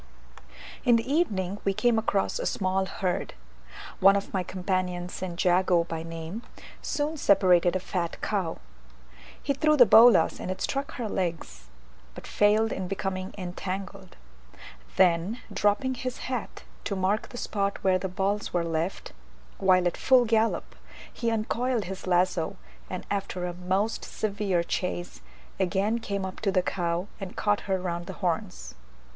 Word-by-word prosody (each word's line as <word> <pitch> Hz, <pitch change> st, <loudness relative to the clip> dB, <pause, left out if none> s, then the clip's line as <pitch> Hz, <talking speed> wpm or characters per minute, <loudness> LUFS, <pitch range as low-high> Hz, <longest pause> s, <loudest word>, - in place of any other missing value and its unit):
In 240 Hz, -, +5 dB
the 230 Hz, +1 st, 0 dB
evening 205 Hz, -, 0 dB
we 195 Hz, -1 st, 0 dB
came 240 Hz, 0 st, +3 dB
across 200 Hz, -3 st, 0 dB
a -, -, -1 dB
small 190 Hz, 0 st, 0 dB
herd. 185 Hz, -, -2 dB, 0.6 s
One 195 Hz, +1 st, +7 dB
of 200 Hz, -, -3 dB
my 190 Hz, -, +1 dB
companions, 180 Hz, -1 st, -2 dB
St. 180 Hz, -2 st, -5 dB
Jago 180 Hz, -1 st, +4 dB
by 165 Hz, -1 st, -5 dB
name, 165 Hz, +5 st, -6 dB, 0.4 s
soon 300 Hz, +2 st, -2 dB
separated 180 Hz, -, +4 dB
a -, -, +1 dB
fat 175 Hz, -2 st, -3 dB
cow: 190 Hz, -6 st, -2 dB, 0.9 s
he 280 Hz, -, +1 dB
threw 305 Hz, +2 st, +3 dB
the 245 Hz, -, +9 dB
bolas, 225 Hz, -5 st, +6 dB
and -, -, -5 dB
it 185 Hz, 0 st, -3 dB
struck 275 Hz, +7 st, -2 dB
her 240 Hz, -3 st, -3 dB
legs, 165 Hz, -, -3 dB, 0.5 s
but -, -, -9 dB
failed 215 Hz, +2 st, +3 dB
in 190 Hz, -1 st, -3 dB
becoming 190 Hz, 0 st, -3 dB
entangled. 190 Hz, +1 st, -6 dB, 0.8 s
Then 185 Hz, +5 st, +3 dB
dropping 205 Hz, +6 st, +1 dB
his 255 Hz, 0 st, -4 dB
hat 250 Hz, -3 st, -4 dB, 0.2 s
to 200 Hz, -, -1 dB
mark 190 Hz, +3 st, 0 dB
the 245 Hz, -, -9 dB
spot 200 Hz, -3 st, -1 dB
where 185 Hz, -1 st, +3 dB
the 190 Hz, +1 st, -3 dB
balls 200 Hz, +2 st, -1 dB
were 175 Hz, -1 st, 0 dB
left, 165 Hz, +3 st, -3 dB, 0.5 s
while 185 Hz, -2 st, +4 dB
at 175 Hz, -, 0 dB
full 255 Hz, -2 st, +5 dB
gallop, 225 Hz, 0 st, +1 dB, 0.4 s
he 235 Hz, -, -1 dB
uncoiled 230 Hz, +1 st, 0 dB
his 190 Hz, 0 st, -7 dB
lazo, 180 Hz, 0 st, +1 dB, 0.3 s
and 185 Hz, -, -5 dB
after 195 Hz, -3 st, -2 dB
a 175 Hz, -, -3 dB
most 185 Hz, +5 st, -1 dB
severe 200 Hz, -4 st, -1 dB
chase, 175 Hz, 0 st, -3 dB, 0.4 s
again 195 Hz, +5 st, +1 dB
came 200 Hz, -3 st, -3 dB
up 190 Hz, -, -6 dB
to 205 Hz, -3 st, 0 dB
the 185 Hz, -1 st, +2 dB
cow, 175 Hz, -1 st, -1 dB
and 195 Hz, -3 st, -7 dB
caught 205 Hz, -1 st, +1 dB
her 190 Hz, -1 st, +2 dB
round 175 Hz, -1 st, -4 dB
the -, -, -5 dB
horns. 180 Hz, +2 st, -2 dB
190 Hz, 155 wpm, -27 LUFS, 180-215 Hz, 0.9 s, the